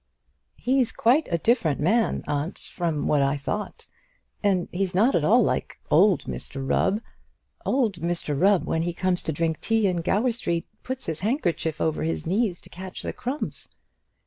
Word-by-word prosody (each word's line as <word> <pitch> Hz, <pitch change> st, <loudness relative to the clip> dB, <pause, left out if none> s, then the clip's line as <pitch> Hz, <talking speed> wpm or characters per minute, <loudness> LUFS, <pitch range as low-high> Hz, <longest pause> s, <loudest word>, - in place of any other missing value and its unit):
"He's 255 Hz, -1 st, +1 dB
quite 275 Hz, +4 st, +3 dB
a 170 Hz, -, +2 dB
different 165 Hz, -, +2 dB
man, 220 Hz, +9 st, +2 dB
aunt, 145 Hz, +5 st, -2 dB
from 165 Hz, -4 st, -3 dB
what 150 Hz, -2 st, +3 dB
I 140 Hz, +1 st, +2 dB
thought; 205 Hz, +9 st, -4 dB, 0.6 s
and 190 Hz, -4 st, +2 dB
he's 185 Hz, 0 st, -2 dB
not 225 Hz, +8 st, +4 dB
at 165 Hz, -, +2 dB
all 230 Hz, +9 st, +5 dB
like -, -, -1 dB
old 190 Hz, +3 st, +5 dB
Mr 135 Hz, -1 st, -5 dB
Rubb. 205 Hz, +9 st, +2 dB, 0.7 s
Old 235 Hz, -8 st, +1 dB
Mr 170 Hz, -3 st, -2 dB
Rubb, 190 Hz, +5 st, +3 dB
when 160 Hz, -, 0 dB
he 175 Hz, +1 st, -1 dB
comes 185 Hz, 0 st, +1 dB
to -, -, -2 dB
drink 160 Hz, +1 st, -1 dB
tea 225 Hz, -1 st, +2 dB
in 180 Hz, -2 st, +1 dB
Gower 210 Hz, +9 st, +1 dB
Street, 170 Hz, -7 st, -2 dB, 0.2 s
puts 260 Hz, 0 st, -5 dB
his 160 Hz, -1 st, -3 dB
handkerchief 175 Hz, -, -1 dB
over 160 Hz, -1 st, 0 dB
his 165 Hz, +1 st, -2 dB
knees 190 Hz, +1 st, 0 dB
to -, -, -15 dB
catch 185 Hz, +1 st, -7 dB
the -, -, -3 dB
crumbs." 260 Hz, +5 st, -4 dB
180 Hz, 170 wpm, -25 LUFS, 160-225 Hz, 0.7 s, all